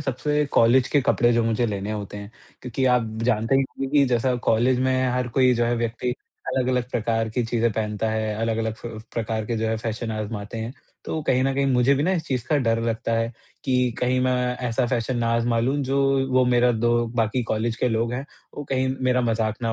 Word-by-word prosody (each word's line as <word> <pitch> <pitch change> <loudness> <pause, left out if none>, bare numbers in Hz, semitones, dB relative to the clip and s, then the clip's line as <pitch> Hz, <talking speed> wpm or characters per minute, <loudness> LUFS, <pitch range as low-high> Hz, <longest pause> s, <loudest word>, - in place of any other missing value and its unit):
सबसे 150 +2 0
कॉलेज 125 +2 +5
के 145 - +3
कपड़े 120 -1 +3
जो 115 0 +2
मुझे 115 +1 +1
लेने 100 -1 -3
होते 105 -1 -5
हैं, 100 0 -8 0.3
क्योंकि 125 +1 -2
आप 120 -2 +1 0.2
जानते 115 +1 +1
ही 135 - +3
होंगे 135 0 -5
कि 140 - +6
जैसा 125 +1 +1
कॉलेज 125 +3 +3
में 130 0 +1
हर 125 -1 -1
कोई 130 -1 +5
जो 120 0 +1
है, 120 +1 +1
व्यक्ति 120 +1 -2 0.4
अलग-अलग 125 -1 0
प्रकार 115 0 0
की 120 +2 -1
चीज़ें 115 0 +1
पहनता 105 0 -2
है, 110 -1 -1
अलग-अलग 110 0 -1
फ - - -6 0.3
प्रकार 110 -1 -2
के 115 - -2
जो 110 - -1
है 110 - 0
फैशन 110 +1 -4
आज़माते 105 0 -5
हैं। 115 +2 -4 0.3
तो 160 - -3
कहीं 130 0 +3
न 135 - +1
कहीं 140 0 +1
मुझे 130 0 +3
भी 140 - 0
ना 185 +4 +2
इस 170 - 0
चीज़ 125 -3 -2
का 150 - +2
डर 115 -4 +1
लगता 115 0 -1
है 115 +1 0 0.3
कि, 125 -3 +1
कहीं 125 +1 +1
मैं 130 0 +2 0.4
ऐसा 120 +2 0
फैशन 120 +1 -1
ना 115 - 0
आज़मा 115 0 +1
लूँ, 130 +5 +1
जो 135 0 +1
वो 130 0 +4
मेरा 125 0 +3
दो 120 +1 +1
बाकी 115 +2 +1
कॉलेज 115 +1 -1
के 125 - +1
लोग 115 +1 0
हैं, 130 +3 -3 0.3
वो 145 - -5
कहीं 130 0 +1
मेरा 125 0 +2
मज़ाक 110 -2 0
ना 115 - 0
120 Hz, 220 wpm, -24 LUFS, 115-130 Hz, 0.4 s, कि